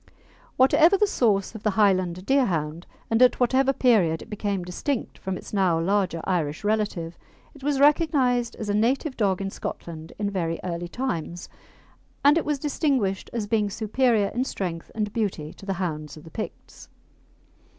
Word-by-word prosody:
Whatever 320 +8 +5
the 420 - +4
source 215 - +1
of 220 - -8
the 215 - +1
Highland 185 -3 +2
Deerhound, 175 - 0 0.2
and 225 +2 +3
at 250 - +5
whatever 260 +2 +3
period 210 -12 +2
it - - -17
became 200 -3 -2
distinct 225 - -3
from 190 -1 -3
its - - -11
now 185 -5 +2
larger 185 -1 0
Irish 160 -4 -1
relative, 205 -6 -1 0.3
it 285 - -16
was 285 -1 0
recognised 275 -5 +3
as 215 - -6
a 205 - 0
native 255 +6 +1
dog 195 -4 +1
in 195 0 -3
Scotland 160 -4 -7
in 205 -1 -2
very 165 -4 -2
early 175 -1 -3
times, 175 -6 -4 0.8
and 290 +1 +7
it 330 - +1
was 295 -1 0
distinguished 270 - 0
as 230 -3 -2
being 210 -1 +1
superior 220 0 +1
in 245 +4 -1
strength 175 -10 -4
and 210 -2 -2
beauty 185 -9 -2
to 195 - -14
the 195 - 0
hounds 155 -5 -4
of 155 - -12
the 165 - -13
Picts. 215 - -8
205 Hz, 170 wpm, -25 LUFS, 175-250 Hz, 0.8 s, and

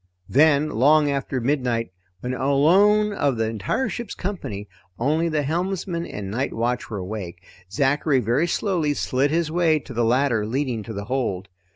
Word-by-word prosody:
Then, 150 +2 +4
long 145 +5 +4
after 135 -1 -2
midnight 120 -5 -1 0.3
when, 125 +1 -3
alone 185 +11 +3
of 140 - 0
the 110 0 0
entire 110 - -1
ship's 240 -2 -5
company, 135 - -5 0.3
only 155 +7 +1
the 155 -2 0
helmsman 170 +2 -2
and 100 -2 -6
night 130 +6 -2
watch 120 +2 -2
were 105 - -4
awake, 90 -2 -6 0.3
Zachary 140 +4 +2
very 125 +8 +1
slowly 170 -5 0
slid 135 +2 +1
his 160 0 0
way 165 -2 +3
to 140 -3 -9
the 120 0 0
ladder 120 -1 +2
leading 125 +1 -2
to 115 - -6
the 100 0 -5
hold. 105 -7 -2
135 Hz, 165 wpm, -23 LUFS, 115-155 Hz, 0.3 s, Then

